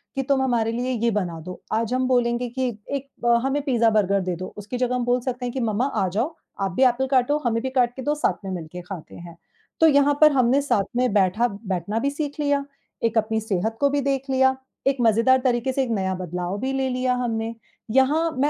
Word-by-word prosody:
कि 270 - 0
"तुम 275 0 +1
हमारे 230 -3 +1
लिए 245 +2 -2
ये 235 -1 +1
बना 180 -5 -2
दो," 180 +3 -9
आज 230 +2 0
हम 255 0 +1
बोलेंगे 245 -1 +1
कि 260 +1 -2 0.2
"एक 280 0 -3 0.2
अ, 235 0 +5
हमें 285 +2 0
पिज़्ज़ा, 240 -5 +3
बर्गर 200 -2 +2
दे 180 -1 -2
दो।" 185 +2 -7
उसकी 210 +4 -5
जगह 250 0 0
हम 245 - -1
बोल 245 +1 +2
सकते 250 -1 -4
हैं 245 - -4
कि 265 - -3
"मम्मा 225 +2 0 0.2
आ 190 - +1
जाओ, 245 - -2 0.3
आप 195 -1 0
भी 260 +9 +2
एप्पल 255 +2 +2
काटो, 265 +3 +3
हमें 230 -1 +1
भी 260 - -1
काट 245 -2 +1
के 265 - -6
दो, 295 +3 0
साथ 290 -8 -1
में 190 - -4
मिलके 175 0 -6
खाते 180 -2 -9
हैं।" 170 -1 -11 0.4
तो 325 - +6
यहाँ 285 -1 +4
पर 305 -1 +8
हमने 260 +1 +3
साथ 210 -8 +1
में 250 -3 +2
बैठा 205 +4 +3 0.3
बैठना 200 +6 -2
भी 280 - 0
सीख 290 0 -4
लिया, 285 -1 +1 0.4
एक 230 0 +1
अपनी 220 0 +1
सेहत 220 +1 -2
को 280 - +4
भी 285 0 0
देख 275 0 -1
लिया, 265 0 +3 0.3
एक 275 -1 +2
मज़ेदार 230 +3 +4
तरीके 245 +1 +1
से 270 - +1
एक 250 - -4
नया 190 -3 0
बदलाव 180 +1 -4
भी 265 +1 -2
ले 265 -1 0
लिया 255 0 0
हमने। 225 -1 -2 0.4
यहाँ 285 +7 +3
मैं 290 +2 +3
245 Hz, 235 wpm, -23 LUFS, 215-265 Hz, 0.4 s, पर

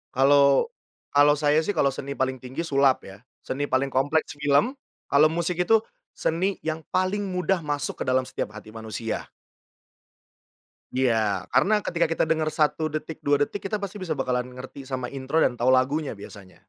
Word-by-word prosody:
Kalau 140 - +5 0.4
kalau 145 +1 +6
saya 150 +1 +3
sih 205 - 0
kalau 140 -3 +3
seni 140 +1 -5
paling 130 0 -1
tinggi, 130 +5 -5
sulap 140 -4 +3
ya. 95 +1 -11 0.2
Seni 145 +2 -3
paling 135 +1 +1
kompleks, 145 +3 0
film. 145 - +2 0.3
Kalau 145 +2 +6
musik 170 +1 -1
itu, 220 +4 +4 0.3
seni 185 +4 -1
yang 160 0 -3
paling 185 +2 +1
mudah 185 0 0
masuk 145 -3 -2
ke - - -10
dalam 130 0 +2
setiap 105 - -4
hati 110 0 -11
manusia. 110 0 -5 1.7
Iya. 110 -7 +1
Karena 195 - +3
ketika 170 -1 +1
kita 165 - 0
dengar 160 -1 0
1 155 0 +1
detik, 155 +1 -5
2 145 0 +2
detik, 205 - -4
kita 215 - -2
pasti 200 0 -5
bisa 165 -5 -3
bakalan 125 -2 -1
ngerti 130 +1 -9
sama 130 -2 -4
intro, 140 +4 0
dan 120 - 0
tahu 120 - +1
lagunya 140 +1 0
biasanya. 100 -2 -13
145 Hz, 170 wpm, -25 LUFS, 130-160 Hz, 1.7 s, kalau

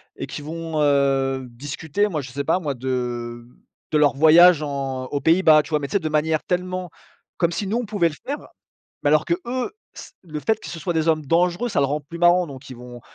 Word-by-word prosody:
et - - -5
qui - - -7
vont, 160 0 -4
heu, 135 -2 +2
discuter 145 - -2
moi 155 -7 -3
je 130 -1 -9
sais 140 +2 -3
pas 165 +5 +1
moi 145 -5 -3
de 120 -2 -4 0.5
de 155 - +3
leur 145 -2 +3
voyage 160 +2 +6
en 135 -2 -3
aux 140 +1 -3
Pays-bas 160 -1 +5
tu - - -12
vois? 150 -1 +1
Mais 140 - -4
c'est 200 - +2
de 155 -2 -3
manière 155 0 +1
tellement 185 0 -3 0.5
comme 170 -1 +1
si 190 +4 -3
nous 220 +4 0
on 245 - -2
pouvait 200 -5 +1
le 155 - -10
faire. 285 +2 -2 0.7
Mais - - +1
alors 155 0 +3
que 170 - +1
eux 255 +10 -3 0.2
c - - -10
le 155 -3 -6
fait 220 +6 +1
que - - -9
ce 170 - -6
soit 175 +1 -3
des 160 0 0
hommes 155 -2 +1
dangereux 175 - +1
ça - - 0
le 140 - +3
rend 145 +2 -1
plus 165 +4 -10
marrant. 175 0 +4
Donc 135 -1 -11
ils 130 - -8
vont 120 -1 -11
155 Hz, 235 wpm, -22 LUFS, 140-175 Hz, 0.7 s, voyage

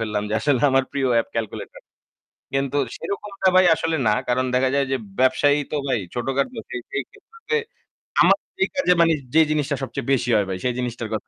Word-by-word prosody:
ফেললাম 105 -2 -2
যে - - 0
আসলে 135 -1 +1
আমার 135 0 +3
প্রিয় 135 -2 0
app - - -7
calculator। 110 -2 -5 0.7
কিন্তু 135 +1 0 0.2
সেরকমটা 200 -1 -2
ভাই 185 0 +6
আসলে 165 0 -1
না। 105 - +4 0.2
কারণ 130 +1 +1
দেখা 130 0 +2
যায় 140 -1 +2
যে, 135 - +1 0.2
ব্যবসায়ী 145 +3 +3
তো 150 - 0
ভাই 125 -4 +1
ছোটখাটো 135 - -2
সেই 125 - -5
সেই 140 - -2
ক্ষেত্রে 450 +3 -5 0.6
আমার - - +6 0.3
এই - - +2
কাজে 275 -10 +3
মানে 165 -1 +4 0.2
যে 160 - +8
জিনিসটা 150 -1 0
সবচেয়ে 135 - -5
বেশি 125 -1 0
হয় 100 -2 +2
ভাই 95 - -2
সেই 125 - +1
জিনিসটার 120 -2 -4
কথা 110 - -4
135 Hz, 190 wpm, -22 LUFS, 125-160 Hz, 0.7 s, যে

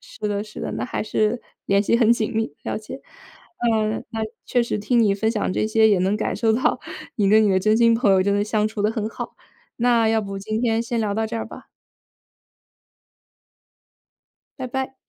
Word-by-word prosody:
是 - - -16
的， 205 0 -1
是 215 0 -10
的。 - - -4
那 - - -3
还 - - -3
是 215 +2 0 0.3
联 200 0 +3
系 230 - +2
很 235 -1 +5
紧 220 -2 -1
密， 220 -10 -1
了 - - -3
解。 220 +5 -9 0.7
嗯， 215 0 0
那， 225 - -4 0.3
确 245 - +2
实 235 - -2
听 235 +4 +1
你 205 -3 +3
分 220 +2 0
享 210 -4 -1
这 215 - 0
些， 220 0 +4
也 200 -3 +3
能 190 +3 +1
感 215 - -2
受 225 -2 +2
到 260 +7 +1 0.4
你 205 -3 +2
跟 215 +2 +5
你 205 - +3
的 190 -1 +2
真 215 +2 +3
心 230 0 +5
朋 225 -3 +2
友， 190 -1 +4
真 200 +1 +1
的 205 - +2
相 210 0 0
处 215 -1 -5
得 210 +1 +2
很 220 -2 -3
好， - - -7 0.4
那 235 -2 +3
要 225 0 +2
不 195 -1 -5
今 215 +3 -3
天 225 -1 +2
先 235 0 -3
聊 210 -2 0
到 220 +1 -1
这 230 +1 -4
儿 - - -3
吧。 - - -12 2.9
拜 260 - -4
拜。 265 +1 -4
220 Hz, 225 characters per minute, -22 LUFS, 205-230 Hz, 2.9 s, 很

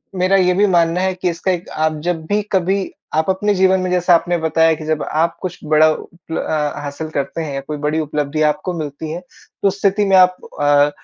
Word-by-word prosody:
मेरा 185 +1 +2
ये 180 -1 +3
भी 200 +3 +3
मानना 170 -1 +2
है 190 0 0
कि 180 0 -1
इसका 175 +2 -1
एक 180 -1 -4
आप 155 0 -1
जब 160 -2 -3
भी 205 +3 +1
कभी 190 +1 0 0.2
आप 160 +3 +1
अपने 205 +2 +1
जीवन 190 0 +3
में 185 - -2
जैसा 180 0 +3
आपने 175 +1 +1
बताया 160 0 +2
कि 155 0 -9
जब 155 -1 -1
आप 165 +2 0
कुछ 180 -1 -5
बड़ा 155 +1 +5
उपल 165 +1 -7
अ, 150 -2 -1
हासिल 145 +2 -6
करते 145 +2 -3
हैं 150 -3 -4
या 135 - -3
कोई 150 +2 -6
बड़ी 150 +2 -1
उपलब्धि 150 0 -2
आपको 180 +4 -5
मिलती 155 +1 -5
है 170 - -4
तो 180 +2 -6
उस 200 +1 -1
स्थिति 200 +1 +2
में 195 -1 +3
आप 180 0 +5 0.3
अ, 145 0 +4
165 Hz, 230 wpm, -18 LUFS, 155-185 Hz, 0.3 s, बड़ा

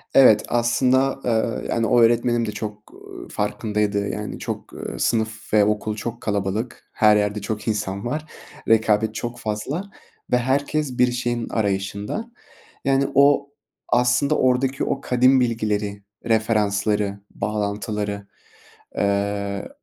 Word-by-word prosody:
Evet, 110 -6 +7
aslında, 130 +3 +2
ııı, 115 -1 0
yani, 115 -1 +1
o 120 -1 +4
öğretmenim 120 0 +3
de 105 - -3
çok 105 0 -7 0.4
farkındaydı, 105 -1 -1
yani, 105 0 -5
çok, - - -6
ııı, - - -6
sınıf 110 -1 -1
ve 105 -1 +6
okul 105 0 -1
çok 115 +2 -5
kalabalık, 105 +3 -3
her 105 -1 +5
yerde 105 0 0
çok 105 +1 -4
insan 100 -2 -2
var, 150 +6 -2 0.4
rekabet 110 -1 +3
çok 120 +1 -4
fazla 110 - -3 0.5
ve 125 - +5
herkes 135 +1 0
bir 125 0 +4
şeyin 120 -1 -2
arayışında, 100 - -2 0.5
yani, 135 0 +3
o, 140 +1 +4 0.4
aslında, 125 +5 +3
oradaki 130 +1 +1
o 135 - -1
kadim 130 +1 +4
bilgileri, 105 -4 -1 0.2
referansları, 105 -2 +1
bağlantıları, 105 -1 -3 0.7
ııı, 100 0 -1
110 Hz, 120 wpm, -22 LUFS, 105-125 Hz, 0.7 s, Evet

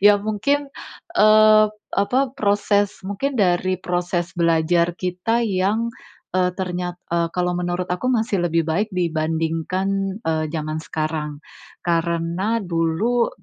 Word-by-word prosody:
Ya 205 +1 +7
mungkin, 275 +8 -1 0.5
eee, 215 0 +7 0.3
apa, 200 +6 +2 0.2
proses 205 -3 +1
mungkin 270 +7 -2
dari 185 0 +2
proses 175 -1 -2
belajar 170 +1 +2
kita 185 +6 -1
yang, 210 +3 0 0.4
eee, 180 0 +2
ternyat 180 -1 -3 0.2
eee, 170 -1 +1
kalau 180 0 0
menurut 175 +1 -2
aku 215 +8 -1
masih 225 -5 +1
lebih 165 0 +1
baik 170 +7 0
dibandingkan, 170 +4 -1
eee, 160 -1 0
zaman 155 0 -3
sekarang. 155 -1 -4 0.4
Karena 170 +5 0
dulu, 175 +8 +1
180 Hz, 115 wpm, -22 LUFS, 165-205 Hz, 0.5 s, Ya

